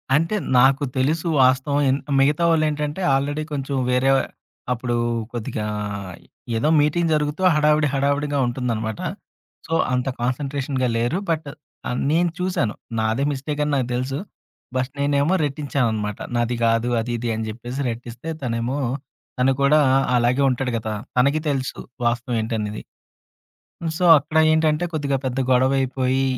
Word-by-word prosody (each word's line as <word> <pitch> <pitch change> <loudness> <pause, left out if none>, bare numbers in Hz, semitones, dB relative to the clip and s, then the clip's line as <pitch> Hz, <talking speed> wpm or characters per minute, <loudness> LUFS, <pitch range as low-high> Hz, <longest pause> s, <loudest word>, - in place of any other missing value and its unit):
అంటే 165 +7 +1 0.2
నాకు 135 +3 +5
తెలుసు 155 +6 +1 0.2
వాస్తవం 130 +3 +2
ఏన్ 135 - +2 0.2
మిగతా 145 +5 +3
వాళ్ళేంటంటే 155 +1 0
ఆల్రెడీ 145 +3 0
కొంచెం 140 -1 -2
వేరే 125 +2 +2 0.6
అప్పుడు 120 0 -2 0.4
కొద్దిగా 110 -2 -3 0.9
ఏదో 135 - +1
మీటింగ్ 160 +3 +2
జరుగుతూ 150 +2 -1
హడావిడి, 150 0 +3
హడావిడిగా 140 +1 0
ఉంటుందనమాట. 115 -3 -2 0.7
సో, 165 - -3 0.2
అంత 125 +2 0
కాన్సంట్రేషన్‌గా 135 0 -1
లేరు. 120 +9 0
బట్ 160 -2 -1 0.4
ఆహ్, 125 - -2
నేను 170 +2 +3
చూసాను. 180 -12 -1 0.2
నాదే 110 +5 0
మిస్టేకని 150 +2 -2
నాకు 130 -3 0
తెలుసు. 130 +2 -2 0.6
బట్ 130 0 0
నేనేమో 145 +4 +2
రెట్టించాననమాట. 125 -8 -1 0.2
నాది 120 +1 0
కాదు, 115 +1 +2
అది, 115 +2 -3
ఇది 115 0 -3
అని 110 0 -3
చెప్పేసి 120 +5 -5
రెట్టిస్తే, 120 +5 -7
తనేమో 120 +2 -1 0.6
తను 130 +1 +4
కూడా 150 +2 +5 0.4
అలాగే 120 +3 +2
ఉంటాడు 125 0 -1
కదా! 110 -1 -4 0.2
తనకి 140 +5 +3
తెలుసు 135 -2 -2 0.3
వాస్తవం 120 +1 0
ఏంటనేది. 110 -1 -3 1.2
సో, 180 - 0
అక్కడేంటంటే 155 +1 +2
కొద్దిగా 140 -3 0
పెద్ద 130 +1 -2
గొడవ 130 +2 +3
అయిపోయి 130 0 0
135 Hz, 125 wpm, -22 LUFS, 120-150 Hz, 1.2 s, నాకు